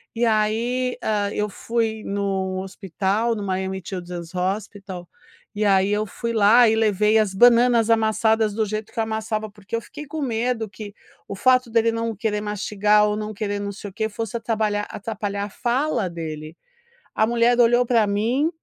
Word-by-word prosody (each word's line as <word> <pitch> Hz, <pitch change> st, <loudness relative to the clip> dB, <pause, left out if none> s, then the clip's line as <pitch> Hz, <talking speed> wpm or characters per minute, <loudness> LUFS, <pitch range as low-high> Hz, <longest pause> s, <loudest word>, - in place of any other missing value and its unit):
e 235 Hz, -, +1 dB
aí, 230 Hz, +3 st, 0 dB
ah, 205 Hz, -2 st, 0 dB
eu 210 Hz, 0 st, -1 dB
fui 220 Hz, 0 st, -2 dB
no 195 Hz, -2 st, -2 dB
hospital 195 Hz, +4 st, -1 dB
no 210 Hz, -, -5 dB
Miami 190 Hz, 0 st, -2 dB
Children's 175 Hz, -2 st, -6 dB
Hospital, 190 Hz, -1 st, -4 dB, 0.5 s
e 210 Hz, 0 st, 0 dB
aí 195 Hz, 0 st, +3 dB
eu 210 Hz, +1 st, 0 dB
fui 235 Hz, +3 st, -4 dB
lá 225 Hz, +3 st, +6 dB
e 220 Hz, -, +2 dB
levei 215 Hz, 0 st, +3 dB
as 210 Hz, -3 st, +1 dB
bananas 235 Hz, +1 st, +5 dB
amassadas 220 Hz, -1 st, +2 dB
do 220 Hz, 0 st, 0 dB
jeito 215 Hz, +1 st, -5 dB
que -, -, -23 dB
eu -, -, +3 dB
amassava, 220 Hz, -1 st, -3 dB
porque 205 Hz, +2 st, -7 dB
eu 230 Hz, -, -2 dB
fiquei 295 Hz, +5 st, -10 dB
com 310 Hz, +2 st, -5 dB
medo 235 Hz, -2 st, -1 dB
que 205 Hz, 0 st, -9 dB, 0.3 s
o 200 Hz, -, -5 dB
fato 255 Hz, +3 st, +3 dB
dele 230 Hz, 0 st, +3 dB
não 230 Hz, -1 st, -2 dB
querer 210 Hz, 0 st, -1 dB
mastigar 210 Hz, 0 st, +2 dB
ou 210 Hz, -, 0 dB
não 215 Hz, 0 st, -4 dB
querer 205 Hz, 0 st, -3 dB
não 200 Hz, 0 st, -4 dB
sei 205 Hz, 0 st, -8 dB
o -, -, -17 dB
quê 220 Hz, 0 st, -1 dB
fosse 225 Hz, +1 st, -4 dB
atrapalhar 215 Hz, -2 st, -1 dB
atrapalhar 205 Hz, -1 st, -4 dB
fala 245 Hz, 0 st, -1 dB
dele, 155 Hz, -1 st, -7 dB, 0.6 s
a 220 Hz, -, +3 dB
mulher 235 Hz, +1 st, +3 dB
olhou 240 Hz, +1 st, +5 dB
para 230 Hz, -3 st, +3 dB
mim 235 Hz, +10 st, +1 dB
215 Hz, 175 wpm, -23 LUFS, 200-230 Hz, 0.6 s, lá